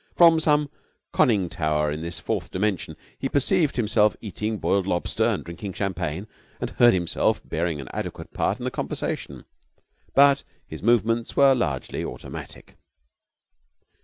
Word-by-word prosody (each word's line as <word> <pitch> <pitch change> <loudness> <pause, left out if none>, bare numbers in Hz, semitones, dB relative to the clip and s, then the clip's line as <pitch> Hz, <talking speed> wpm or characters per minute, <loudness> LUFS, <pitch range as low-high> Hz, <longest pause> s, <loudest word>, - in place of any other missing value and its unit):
From 165 -2 +7
some 150 -2 +2 0.4
conning 100 -7 +3
tower 75 -2 0
in 75 +1 -4
this 85 +1 -5
fourth - - -3
dimension 95 -1 -2 0.2
he 135 - -2
perceived 150 +3 +2
himself 105 -2 +3
eating 105 +1 -3
broiled 100 -2 +1
lobster 85 -2 0
and - - 0
drinking 90 +3 -7
champagne 90 -2 -3 0.3
and - - -3
heard 120 -4 +5
himself 85 -2 +1
bearing 80 -1 -1
an 65 - -7
adequate - - -6
part 100 - 0
in 125 - -8
the 130 - -2
conversation; - - -4 0.7
but 140 0 +6 0.2
his - - -9
movements 115 +1 +2
were 140 -1 +6
largely 75 - -2
automatic. - - -8
105 Hz, 140 wpm, -25 LUFS, 85-130 Hz, 0.7 s, From